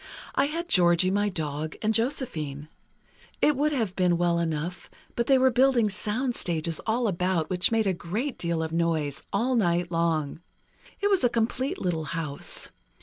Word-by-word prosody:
I - - +2
had 330 +4 -3
Georgie, 180 - +4
my 205 +1 +1
dog, 155 -3 -3
and 215 +1 +2
Josephine. 155 - -2 0.7
It 300 - +3
would 295 +3 +1
have 225 -10 -1
been 180 -2 +2
well 170 -1 +1
enough, 165 +2 -3 0.3
but 235 - -1
they 270 - +5
were 260 0 +4
building 245 -3 +3
soundstages 205 -7 -1
all 230 +2 +1
about, 180 -3 0
which 185 +3 +2
made 225 -1 +2
a 190 - +2
great 210 +11 -4
deal 170 -1 -1
of 160 0 -4
noise, 160 -4 0
all 235 +6 +1
night 175 -5 +1
long. 165 -2 0 0.6
It 405 0 +2
was 385 -8 +2
a 245 - +5
complete 245 +4 -1
little 165 -4 -1
house. 150 -2 -4
185 Hz, 165 wpm, -26 LUFS, 165-235 Hz, 0.7 s, they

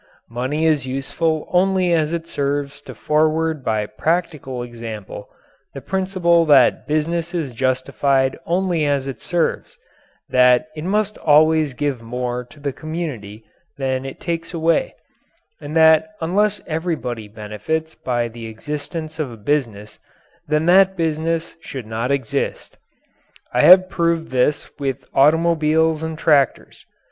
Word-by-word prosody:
Money 130 +7 -1
is 150 -4 +2
useful 155 +4 -2
only 185 -1 +3
as 155 -2 +1
it 170 -1 -3
serves 140 0 -2
to - - -11
forward 155 -1 +1
by 110 -3 0
practical 135 +1 -2
example 115 -4 -8 0.5
the - - -4
principle 185 -3 +1
that 140 -6 +4
business 165 +3 -1
is 150 -7 -3
justified 130 +2 +1
only 175 -2 0
as 140 -2 0
it 135 -2 -6
serves, 175 -2 -2 0.5
that 125 +4 +4
it 155 - -6
must 210 +2 -1
always 155 -2 +3
give 140 -3 -2
more 125 +1 -3
to 125 +4 -18
the 140 -1 -3
community 135 -11 -6 0.3
than 130 -1 -1
it 135 0 -8
takes 165 0 -4
away, 165 0 +1 0.7
and 145 +2 -7
that 160 +6 +5
unless 205 +5 +1
everybody 155 -9 -3
benefits 110 +10 -4
by 120 -2 -2
the 115 0 -9
existence 150 +7 -6
of 145 -5 -2
a 115 - -10
business 110 -4 -2 0.5
then 150 +1 +1
that 190 +2 +5
business 165 0 -1
should 130 -7 -7
not 110 +3 -3
exist. 140 -5 -2 0.8
I - - +3
have 185 +1 +8
proved 170 -3 -1
this 130 +3 +1
with 135 -1 -3
automobiles 160 +1 +3
and 160 -1 -4
tractors. 145 -4 +1
150 Hz, 135 wpm, -20 LUFS, 130-165 Hz, 0.8 s, have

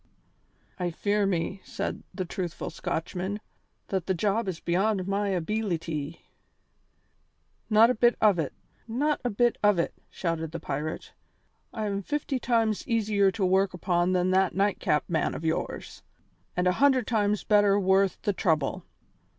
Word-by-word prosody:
"I 180 -1 0
fear 205 +4 0
me," 190 +1 -2
said - - -4
the 185 - -4
truthful 175 -1 -4
Scotchman, 185 +5 -3 0.5
"that 190 -3 -2
the 190 - +1
job 205 +4 0
is 180 -3 -3
beyond 190 +2 0
my 200 +1 0
abeelity." 170 -5 -2 1.5
"Not 225 +2 +6
a - - +1
bit 240 +1 +3
of 205 -5 +4
it, 150 - -1 0.4
not 290 +7 0
a 245 - 0
bit 240 +2 +1
of 205 -3 +4
it," 170 - 0 0.2
shouted 165 -2 -3
the 170 - -4
pirate. 150 0 -4 0.6
"I 220 -2 -3
am 200 -1 -2
fifty 285 +3 -2
times 225 -3 +1
easier 210 -4 +2
to 190 0 -1
work 190 0 +2
upon 175 0 +1
than 180 0 +2
that 190 0 +2
Nightcap 195 -6 +1
man 160 -3 0
of 165 - -6
yours, 160 - -3 0.6
and 180 - +1
a 180 - +4
hundred 265 -4 +4
times 210 -3 +1
better 205 -1 +4
worth 190 0 +2
the 205 - +1
trouble. 155 -7 0
195 Hz, 150 wpm, -27 LUFS, 175-215 Hz, 1.5 s, Not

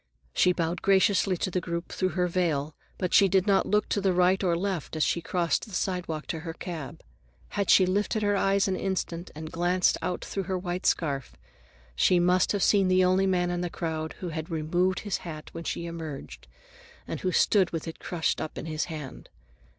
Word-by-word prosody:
She 180 - +4
bowed 170 0 -2
graciously 195 -1 +3
to 185 - -2
the 180 - 0
group, 170 0 -4
through 185 0 -2
her 180 - +3
veil, 160 -5 0 0.2
but 180 -2 -2
she 195 - +7
did 190 0 +3
not 200 -2 +3
look 210 0 +2
to 200 - 0
the 190 -1 +2
right 180 +2 +3
or 170 -2 +2
left 185 -4 -3
as 155 - +1
she 170 - +1
crossed 170 0 0
the 205 - -7
sidewalk 175 -5 -2
to 160 - -2
her 165 0 -6
cab. 165 -4 -7 0.5
Had 200 -2 -2
she 185 - +7
lifted 205 +3 0
her 205 0 +2
eyes 195 0 +2
an 190 - 0
instant 180 -2 -3
and 155 +1 -7
glanced 175 +2 +2
out 180 - -3
through 195 -2 -3
her 190 - 0
white 180 0 -2
scarf, 140 -6 -1 0.6
she 180 - +4
must 180 +1 +3
have 200 -2 0
seen 195 -2 +4
the 185 0 +4
only 185 +1 +3
man 180 -2 +1
in 175 0 -2
the 175 - -2
crowd 160 -2 -3
who 180 - -3
had 160 +1 -5
removed 175 +3 0
his 205 -3 -2
hat 155 -3 -8
when 165 - -7
she 170 - -3
emerged, 160 -4 -7 0.6
and - - -4
who 185 - -1
stood 190 -1 +3
with 165 0 -5
it 165 - -7
crushed 170 -3 -1
up 155 - -5
in - - -5
his 155 -1 -2
hand. 155 -6 -8
180 Hz, 210 wpm, -27 LUFS, 165-190 Hz, 0.6 s, she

